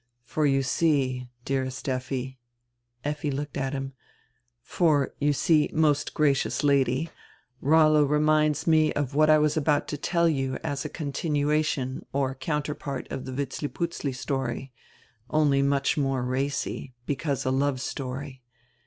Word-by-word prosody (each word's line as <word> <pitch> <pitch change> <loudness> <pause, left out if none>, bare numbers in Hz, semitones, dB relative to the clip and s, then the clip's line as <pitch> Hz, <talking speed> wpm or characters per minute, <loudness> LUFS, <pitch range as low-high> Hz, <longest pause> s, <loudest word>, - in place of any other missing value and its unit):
For, 150 +4 0
you 135 -1 +2
see, 130 -4 +1 0.2
dearest 130 -1 -2
Effi 130 0 -3 0.2
— 120 0 -52
" 120 0 -47
Effi 150 +1 -2
looked 145 +1 -4
at 135 0 -2
him, 135 0 -4 0.7
"For, 150 -3 +1
you 145 +1 +3
see, 150 +2 +3
most 150 -2 +1
gracious 145 -1 +1
Lady, 140 +2 +2 0.5
Rollo 155 +1 +5
reminds 150 +1 +2
me 155 -2 +4
of 145 -2 -2
what 155 +2 +4
I 155 - +7
was 150 0 +2
about 150 -1 +1
to 150 - -3
tell 170 +1 +2
you 135 -4 0
as 140 -1 -2
a 150 - -4
continuation 145 -2 -1
or 135 -1 0
counter 150 +3 -2
part 140 -3 -6
of 130 - -4
die 130 - -5
Vitzliputzli 145 +2 -3
story, 135 0 -3 0.6
only 145 -2 +3
much 140 +1 +1
more 135 -3 0
racy, 130 0 -2
because 140 -1 -2
a 130 - +1
love 135 0 +1
story. 130 0 -5
140 Hz, 145 wpm, -26 LUFS, 130-150 Hz, 0.7 s, I